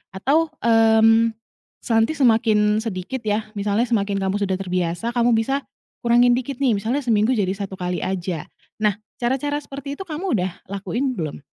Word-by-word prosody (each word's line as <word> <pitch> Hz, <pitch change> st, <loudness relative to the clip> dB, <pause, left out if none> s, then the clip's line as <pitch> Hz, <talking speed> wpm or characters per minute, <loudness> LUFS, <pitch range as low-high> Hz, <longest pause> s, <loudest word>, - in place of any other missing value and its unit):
Atau, 300 Hz, +10 st, +1 dB
mmm, 225 Hz, 0 st, +5 dB, 0.6 s
nanti 225 Hz, +6 st, +3 dB
semakin 220 Hz, -5 st, +3 dB
sedikit, 225 Hz, +4 st, -4 dB
ya, 215 Hz, +1 st, 0 dB
misalnya, 205 Hz, +3 st, +1 dB
semakin 200 Hz, -3 st, 0 dB
kamu 195 Hz, +1 st, 0 dB
sudah 195 Hz, -1 st, 0 dB
terbiasa, 180 Hz, +2 st, -2 dB
kamu 240 Hz, 0 st, +3 dB
bisa 270 Hz, +5 st, 0 dB, 0.4 s
kurangin 240 Hz, +1 st, +5 dB
dikit 260 Hz, 0 st, -5 dB
nih, 250 Hz, -5 st, +3 dB
misalnya, 230 Hz, +8 st, -1 dB
seminggu 225 Hz, 0 st, +2 dB, 0.2 s
1 195 Hz, -1 st, -6 dB
kali 180 Hz, 0 st, -2 dB
aja. 180 Hz, -3 st, -3 dB, 0.4 s
Nah, 210 Hz, -2 st, +2 dB, 0.2 s
cara-cara 270 Hz, +4 st, 0 dB
seperti 280 Hz, -1 st, -7 dB
itu -, -, -5 dB
kamu 315 Hz, -, -1 dB
udah 185 Hz, +1 st, -1 dB, 0.2 s
lakuin, 235 Hz, +7 st, -2 dB
belum? 155 Hz, -3 st, -4 dB
225 Hz, 150 wpm, -22 LUFS, 200-255 Hz, 0.6 s, mmm